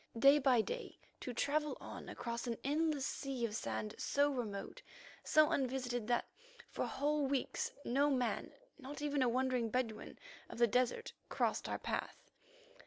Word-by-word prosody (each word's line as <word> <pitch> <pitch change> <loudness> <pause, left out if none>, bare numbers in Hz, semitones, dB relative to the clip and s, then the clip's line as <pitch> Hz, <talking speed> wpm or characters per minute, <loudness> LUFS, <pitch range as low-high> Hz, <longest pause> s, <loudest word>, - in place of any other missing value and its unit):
Day 275 +5 +7
by 260 -4 +5
day 485 - -5 0.2
to 250 - -4
travel 295 +5 0
on - - -8
across 235 +1 -4
an 230 -1 -1
endless 295 0 +1
sea 270 -5 -2
of 215 -2 -3
sand 110 - -3
so 285 +1 +2
remote, 220 -7 -4 0.4
so 310 -1 +5
unvisited 250 -4 -1
that 240 -1 +2 0.5
for - - -1
whole 290 +1 +1
weeks 270 -1 -1
no 280 +4 +3
man, 255 -4 0 0.3
not 290 +2 -7
even 290 -2 +1
a 250 - +4
wandering 250 -1 +1
Bedouin 225 -2 -2 0.3
of - - -8
the 235 - +6
desert, 250 - +1 0.2
crossed - - 0
our - - -1
path. - - -4
260 Hz, 155 wpm, -37 LUFS, 235-285 Hz, 0.5 s, Day